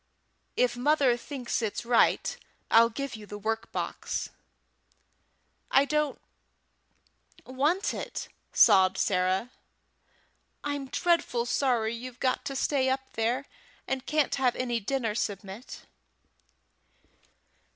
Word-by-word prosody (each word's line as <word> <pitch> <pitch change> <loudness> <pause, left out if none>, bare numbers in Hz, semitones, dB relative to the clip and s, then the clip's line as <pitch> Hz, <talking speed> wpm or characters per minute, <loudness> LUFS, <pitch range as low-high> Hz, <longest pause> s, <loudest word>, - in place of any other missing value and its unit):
If 245 -1 +2
mother 270 -1 +3
thinks 250 0 -4
it's 220 +1 -3
right, 235 -1 +3 0.4
I'll 230 +1 +7
give 275 +2 -5
you 210 -1 -10
the 205 - -7
work 225 +2 -3
box." - - -3 1.4
"I 275 - +5
don't 300 0 0 1.3
want 295 +9 0
it," - - -5 0.2
sobbed 190 0 +6
Sarah. 185 +5 +1 1.1
"I'm 285 -2 -3
dreadful 275 -6 +1
sorry 240 -3 +1
you've 245 +1 -8
got 255 0 0
to 275 -1 -4
stay 265 0 +1
up 265 0 -2
there, 235 +5 0 0.4
and 265 -1 -3
can't 305 -2 +1
have 255 -3 +2
any 240 -2 -1
dinner, 230 0 -1
Submit." 205 +2 -5
250 Hz, 110 wpm, -28 LUFS, 225-275 Hz, 1.4 s, I'll